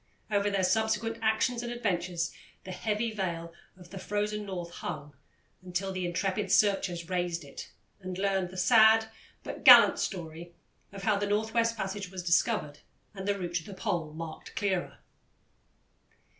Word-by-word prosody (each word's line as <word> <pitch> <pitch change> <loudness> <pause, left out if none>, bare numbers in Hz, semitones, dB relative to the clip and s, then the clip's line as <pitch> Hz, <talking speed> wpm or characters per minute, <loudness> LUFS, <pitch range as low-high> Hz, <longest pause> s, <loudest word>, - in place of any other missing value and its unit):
Over 205 0 +2
their 195 -2 0
subsequent 220 +4 +1
actions 225 +2 +1
and 240 0 -5
adventures 180 -7 -1 0.3
the 185 - -8
heavy 215 +4 -1
veil 170 -5 -4 0.2
of 175 -2 -15
the 195 - -7
Frozen 210 +1 -2
North 175 -3 -5
hung 150 -4 -6 0.5
until 185 +1 -3
intrepid 185 +2 -2
searchers 195 -5 +2
raised 175 -2 -2
it 140 - -10 0.3
and 185 -2 -6
learned 195 -2 0
the 185 - -10
sad 220 +2 +5 0.3
but - - -7
gallant - - +9
story 170 -2 -5 0.4
of 195 -1 -9
how 210 0 +2
the 205 0 -1
North 215 +2 0
West 230 0 +1
Passage 195 -1 -4
was 185 -1 -7
discovered 170 -4 +1 0.3
and 195 -1 -7
the 200 0 +1
route 175 -2 -5
to 165 - -5
the 195 +3 -10
Pole 165 -4 -2
marked 160 0 -8
clearer. 190 -3 -1
190 Hz, 155 wpm, -29 LUFS, 175-210 Hz, 0.5 s, gallant